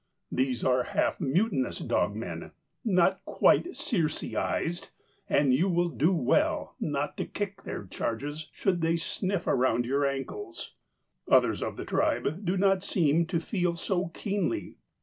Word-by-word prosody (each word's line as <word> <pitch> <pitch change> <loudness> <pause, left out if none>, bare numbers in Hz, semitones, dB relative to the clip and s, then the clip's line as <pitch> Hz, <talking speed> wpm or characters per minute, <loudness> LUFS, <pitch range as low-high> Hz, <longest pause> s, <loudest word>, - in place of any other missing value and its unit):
These 130 -2 0
are 130 -1 +4
half - - 0
mutinous 215 - +1
dogmen, - - -2 0.3
not 190 -4 +3
quite 360 - +3
Circe 160 -8 0
ized, 175 +1 -1 0.4
and 140 -3 +4
you 170 +9 +3
will 175 0 +2
do 160 +2 +2
well 165 -10 +1
not 145 -1 -2
to - - -2
kick 200 -1 -4
their - - -5
charges, 145 +11 -4
should 180 -4 0
they 165 +1 +2
sniff 185 +3 -2
around 120 -2 +2
your 140 +3 +1
ankles. 330 - -5 0.6
Others - - +4
of - - -3
the - - -5
tribe 165 +8 0
do 185 +1 0
not 195 0 +3
seem 165 -1 +2
to 170 -1 0
feel 175 -1 -1
so 180 +1 -1
keenly. 205 - -2
170 Hz, 145 wpm, -28 LUFS, 140-190 Hz, 0.6 s, are